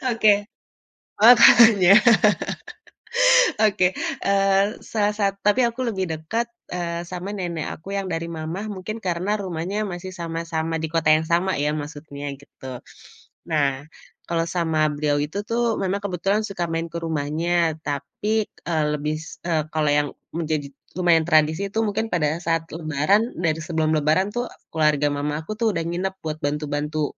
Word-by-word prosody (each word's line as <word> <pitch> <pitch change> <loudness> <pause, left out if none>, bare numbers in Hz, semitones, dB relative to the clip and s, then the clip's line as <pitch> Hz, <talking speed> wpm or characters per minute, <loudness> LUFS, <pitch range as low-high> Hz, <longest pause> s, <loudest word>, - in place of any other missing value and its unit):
Oke. 210 -2 +4 0.8
Makanya, 225 -4 +8 1.7
Oke, 185 -3 +3 0.3
eee, 195 +1 +2
salah 210 -1 0
sa 210 -1 0 0.2
tapi 210 +5 +4
aku 235 +2 -12
lebih 190 -5 -1
dekat, 160 +10 -2 0.3
eee, 170 -1 -3
sama 180 +3 -5
nenek 175 -5 -4
aku 195 +5 -7
yang 195 -1 -2
dari 165 0 -3
mama, 170 +5 -5
mungkin 210 +2 -5
karena 185 +2 -1
rumahnya 190 +3 -3
masih 185 0 -6
sama-sama 165 -2 -3
di 160 - -2
kota 165 -2 0
yang 155 - 0
sama 175 +3 +1
ya, 145 +1 0
maksudnya 145 -1 -6
gitu. 130 -2 -11 0.6
Nah, 145 -3 0 0.4
kalau 165 -1 0
sama 160 -3 +1
beliau 145 0 0
itu 155 +7 -4
tuh, 230 -1 0
memang 195 +1 -1
kebetulan 195 +2 0
suka 175 -3 -3
main 165 0 -2
ke 170 - -4
rumahnya, 160 +1 -1
tapi, 150 +10 -1 0.2
eee, 160 -3 +1
lebih, 150 +1 -2
s 160 - -11
eee, 160 -3 +1
kalau 155 -1 +1
yang 145 0 +2 0.3
menjadi 155 -4 -2 0.3
lumayan 170 -3 +4
tradisi 160 +4 +2
itu 220 - -1
mungkin 215 +2 -1
pada 155 -3 +1
saat 165 -1 0
lebaran, 165 - +1
dari 160 -2 0
sebelum 160 -1 0
lebaran 155 +6 +2
tuh, 240 0 -1 0.3
keluarga 150 -2 +2
mamaku 150 +4 -3
tuh 230 - +2
udah 165 - -1
nginep 185 +3 -2
buat 155 -1 -3
bantu 150 +1 -1
bantu 150 +1 -2
170 Hz, 150 wpm, -23 LUFS, 155-195 Hz, 1.7 s, Makanya